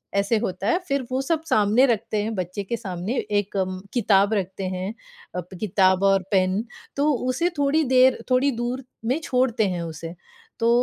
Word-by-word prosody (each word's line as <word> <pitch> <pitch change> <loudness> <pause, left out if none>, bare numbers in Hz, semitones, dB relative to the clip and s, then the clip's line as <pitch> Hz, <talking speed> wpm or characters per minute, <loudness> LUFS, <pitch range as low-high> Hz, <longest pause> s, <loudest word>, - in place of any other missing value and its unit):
ऐसे 200 +3 +2
होता 190 0 -3
है। 345 - +3
फ़िर 275 -3 0
वो 260 +1 0
सब 320 +3 -1
सामने 215 +5 +4
रखते 220 -2 0
हैं, 220 +1 -2
बच्चे 185 +2 -3
के 235 +4 -3
सामने 190 +5 -4 0.2
एक 200 0 -5
अम 185 -1 -1
किताब 205 -3 +3
रखते 190 -1 -2
हैं, 190 +4 -3 0.7
किताब 190 -2 +2
और 195 -1 +4
पेन। 190 +2 +2 0.3
तो 295 +1 +3 0.2
उसे 340 +8 +1
थोड़ी 290 +3 +3
देर 255 0 +4
थोड़ी 270 +2 +4
दूर 240 +2 -3 0.2
में 260 +7 +1
छोड़ते 250 -4 +1
हैं 175 -2 -3
उसे। 165 +1 -7 0.4
तो 230 0 +2
215 Hz, 170 wpm, -24 LUFS, 190-255 Hz, 0.7 s, सामने